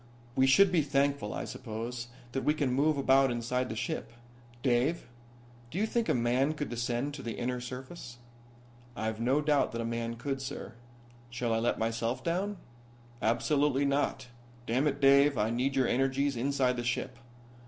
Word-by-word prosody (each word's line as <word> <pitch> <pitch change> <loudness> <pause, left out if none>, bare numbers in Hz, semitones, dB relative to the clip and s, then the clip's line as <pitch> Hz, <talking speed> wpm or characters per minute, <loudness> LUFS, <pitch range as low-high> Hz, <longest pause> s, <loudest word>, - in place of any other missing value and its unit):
"We 130 0 +4
should 190 +8 +6
be 175 -3 +4
thankful, 140 -5 0
I - - -4
suppose, 120 0 -5 0.2
that 135 +2 -2
we 150 - +2
can 140 -5 0
move 145 +3 +2
about 135 0 +4
inside 125 +1 -1
the 110 - -4
ship. 120 0 -4 0.5
Dave, 130 +6 +1 0.6
do 155 - -6
you 210 - +2
think 230 +1 -1
a - - +3
man 125 +5 +1
could 150 -1 -4
descend 120 +4 -2
to 140 - -7
the 115 -3 -5
inner 125 0 -2
surface?" 125 0 -8 0.8
"I've 110 0 -3
no 130 +5 +2
doubt 150 -4 +2
that 115 - -3
a - - -3
man 115 0 -3
could, 135 +3 -3
sir. 135 - -6 0.6
Shall 120 -1 -1
I 115 - +2
let 120 +1 +1
myself 115 +3 -1
down?" 190 +4 -1 0.6
"Absolutely 140 +4 +2
not. 140 -1 0 0.4
Damn 130 +6 +1
it, 145 0 -2
Dave, 140 0 +6
I 105 +2 +1
need 130 +3 0
your 130 -2 +3
energies 135 +2 +1
inside 130 0 +1
the 120 - -2
ship. 120 - -2
130 Hz, 175 wpm, -30 LUFS, 120-140 Hz, 0.8 s, should